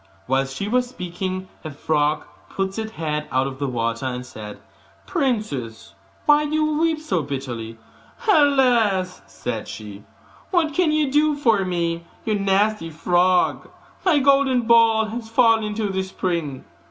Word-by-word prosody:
Whilst 135 Hz, +1 st, 0 dB
she 200 Hz, -, -3 dB
was 250 Hz, +2 st, +1 dB
speaking, 185 Hz, -3 st, -5 dB, 0.2 s
a 155 Hz, -, -5 dB
frog 150 Hz, +1 st, 0 dB, 0.3 s
put 195 Hz, +2 st, -3 dB
its 220 Hz, 0 st, -5 dB
head 150 Hz, -5 st, -3 dB
out 130 Hz, +1 st, +2 dB
of 135 Hz, -1 st, -6 dB
the 140 Hz, -, -1 dB
water, 115 Hz, 0 st, -2 dB
and 125 Hz, -1 st, -4 dB
said, 105 Hz, -4 st, -9 dB, 0.5 s
'Princess, 210 Hz, -, -2 dB, 0.3 s
why 295 Hz, 0 st, +5 dB
do 300 Hz, +1 st, -2 dB
you 310 Hz, -1 st, +1 dB
weep 325 Hz, -1 st, +1 dB
so 190 Hz, -, -1 dB
bitterly?' 125 Hz, -5 st, -5 dB, 0.5 s
'Alas!' 245 Hz, -, +3 dB
said -, -, -5 dB
she, 105 Hz, -1 st, -9 dB, 0.5 s
'what 330 Hz, -5 st, +1 dB
can 340 Hz, -1 st, +2 dB
you 305 Hz, -3 st, +1 dB
do 300 Hz, +1 st, +3 dB
for 230 Hz, -8 st, +2 dB
me, 170 Hz, -2 st, -1 dB, 0.2 s
you 220 Hz, -, +1 dB
nasty 200 Hz, -2 st, +1 dB
frog? 175 Hz, +3 st, +1 dB, 0.3 s
My 360 Hz, -6 st, +4 dB
golden 275 Hz, -2 st, +4 dB
ball 225 Hz, -1 st, +5 dB
has 225 Hz, +1 st, -6 dB
fallen 225 Hz, -1 st, +4 dB
into 210 Hz, 0 st, -2 dB
the 190 Hz, 0 st, -1 dB
spring. 170 Hz, -7 st, -3 dB
195 Hz, 150 wpm, -22 LUFS, 150-250 Hz, 0.5 s, why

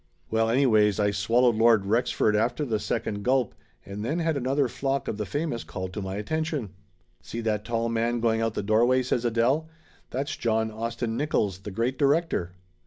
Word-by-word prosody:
Well, 110 Hz, 0 st, +2 dB
anyways, 110 Hz, -5 st, +3 dB
I 105 Hz, -1 st, +2 dB
swallowed 115 Hz, +4 st, +2 dB
Lord 110 Hz, -3 st, +4 dB
Rexford 110 Hz, 0 st, +1 dB
after 120 Hz, +7 st, 0 dB
the 115 Hz, -5 st, 0 dB
86 -, -, -7 dB
Laughter -, -, +2 dB
Limited -, -, -3 dB
second 100 Hz, -, -7 dB
gulp, 130 Hz, -1 st, +1 dB, 0.3 s
and 100 Hz, +1 st, -6 dB
then 145 Hz, +9 st, -1 dB
had 165 Hz, -2 st, 0 dB
another 135 Hz, +1 st, +1 dB
flock 135 Hz, +2 st, -2 dB
of 105 Hz, -, -3 dB
the 105 Hz, -2 st, -3 dB
famous 145 Hz, -, -2 dB
called 90 Hz, +3 st, -6 dB
to 105 Hz, -, -4 dB
my 95 Hz, 0 st, -4 dB
attention. 150 Hz, -, -2 dB, 0.5 s
"See 115 Hz, -, -6 dB
that 105 Hz, -2 st, -1 dB
tall 115 Hz, 0 st, -1 dB
man 115 Hz, +1 st, 0 dB
going 115 Hz, -1 st, +1 dB
out 115 Hz, -1 st, -1 dB
the -, -, -2 dB
doorway?" 120 Hz, +5 st, +3 dB
says 125 Hz, -1 st, -1 dB
Adele. 120 Hz, +7 st, +1 dB, 0.4 s
"That's 135 Hz, +3 st, -3 dB
John 110 Hz, -1 st, 0 dB
Austin 115 Hz, +1 st, -3 dB
Nickolls, 105 Hz, -10 st, 0 dB
the 105 Hz, -, -6 dB
great 115 Hz, +6 st, -2 dB
di 140 Hz, -, +4 dB
rector." 140 Hz, -, +1 dB
115 Hz, 200 wpm, -26 LUFS, 105-130 Hz, 0.5 s, Lord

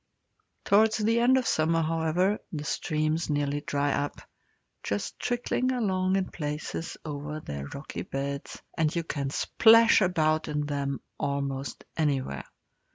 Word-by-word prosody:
Towards 220 Hz, +2 st, +4 dB
the 225 Hz, +2 st, +2 dB
end 250 Hz, +2 st, +5 dB
of 255 Hz, -, 0 dB
summer, 165 Hz, -1 st, +2 dB
however, 165 Hz, +5 st, +1 dB
the 150 Hz, -3 st, -4 dB
streams 155 Hz, +1 st, -1 dB
nearly 145 Hz, 0 st, 0 dB
dry 145 Hz, -1 st, 0 dB
up, 145 Hz, -, -2 dB, 0.6 s
just 100 Hz, 0 st, -3 dB
trickling 245 Hz, +1 st, 0 dB
along 190 Hz, -6 st, +1 dB
in 190 Hz, -1 st, -1 dB
places 150 Hz, +1 st, -4 dB
over 150 Hz, 0 st, -5 dB
their 70 Hz, -, -6 dB
rocky 140 Hz, -, -6 dB
beds, 140 Hz, +1 st, -5 dB
and 155 Hz, -1 st, +1 dB
you 170 Hz, -, 0 dB
can 140 Hz, -4 st, -3 dB
splash 230 Hz, +9 st, +5 dB
about 155 Hz, -4 st, +2 dB
in 150 Hz, -1 st, -1 dB
them 140 Hz, -2 st, -2 dB, 0.2 s
almost 140 Hz, -1 st, -3 dB
anywhere. 135 Hz, -, -1 dB
155 Hz, 135 wpm, -28 LUFS, 145-185 Hz, 0.6 s, end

